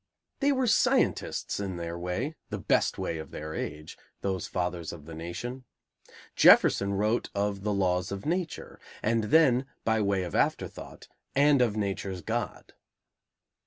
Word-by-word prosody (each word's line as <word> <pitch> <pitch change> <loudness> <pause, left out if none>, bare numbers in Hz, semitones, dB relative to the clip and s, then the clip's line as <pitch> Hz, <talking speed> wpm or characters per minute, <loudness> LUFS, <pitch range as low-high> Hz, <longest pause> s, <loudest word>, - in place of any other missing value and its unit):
They 285 +1 +3
were 260 -2 +1
scientists 220 - +1
in 95 -3 -3
their 85 0 -4
way, 90 - -3 0.2
the - - -3
best - - +1
way 80 - -3
of 80 - -8
their 80 +1 -6
age, 75 +1 -6 0.2
those 95 -3 -2
fathers 90 -2 -3
of 80 -4 -10
the 80 - -9
nation. 90 +11 -6 0.7
Jefferson 100 0 +6
wrote 105 +4 0
of 100 -1 -1
"the 105 +1 -1
laws 90 -2 0
of 100 0 -5
Nature," 170 +1 -3 0.2
and 115 0 +1
then 135 -2 +4 0.2
by 110 -1 +2
way 100 -2 +1
of 85 - -6
afterthought, - - -2 0.3
"and 140 -1 +5
of 110 -4 +2
Nature's 95 -3 -3
God." - - -4
100 Hz, 150 wpm, -28 LUFS, 90-120 Hz, 0.7 s, Jefferson